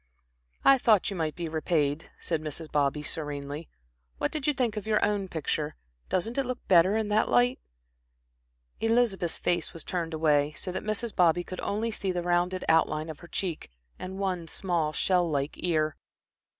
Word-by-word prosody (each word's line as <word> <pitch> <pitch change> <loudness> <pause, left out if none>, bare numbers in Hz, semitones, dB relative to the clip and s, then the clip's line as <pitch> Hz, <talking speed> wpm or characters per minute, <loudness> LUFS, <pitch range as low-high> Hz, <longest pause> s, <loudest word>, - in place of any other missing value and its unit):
"I 275 -1 +7
thought 215 -5 +4
you - - -4
might 160 -3 -2
be 170 -1 -4
repaid," 155 -2 0
said 165 -3 -1
Mrs. 155 +1 -5
Bobby, 145 0 +1
serenely. 145 0 -4 0.5
"What - - -1
did 300 -2 -3
you 295 - +4
think 240 -5 0
of 210 -1 -5
your 215 -1 +3
own 205 -2 0
picture? 155 -2 -2 0.3
Doesn't 225 +8 0
it - - +2
look 255 -1 -5
better 185 +3 +5
in 220 -1 -1
that 210 +1 +2
light?" 120 +1 +3 1.2
Elizabeth's 225 -7 +1
face 175 - 0
was 165 - -7
turned 170 -3 -3
away, 150 -2 +2
so 165 +6 -4
that - - -3
Mrs. 215 +1 -3
Bobby 175 0 +4
could 185 +1 -7
only 220 +3 -1
see 195 -3 -2
the 175 -1 -2
rounded 175 +1 +1
outline 160 -1 +2
of 155 - -11
her 175 - -12
cheek 175 -3 -3 0.3
and 190 +1 -6
one 185 -4 -2
small, 170 -3 0
shell 180 +2 +2
like 140 -1 -1
ear. 155 -3 0
175 Hz, 175 wpm, -28 LUFS, 155-200 Hz, 1.2 s, I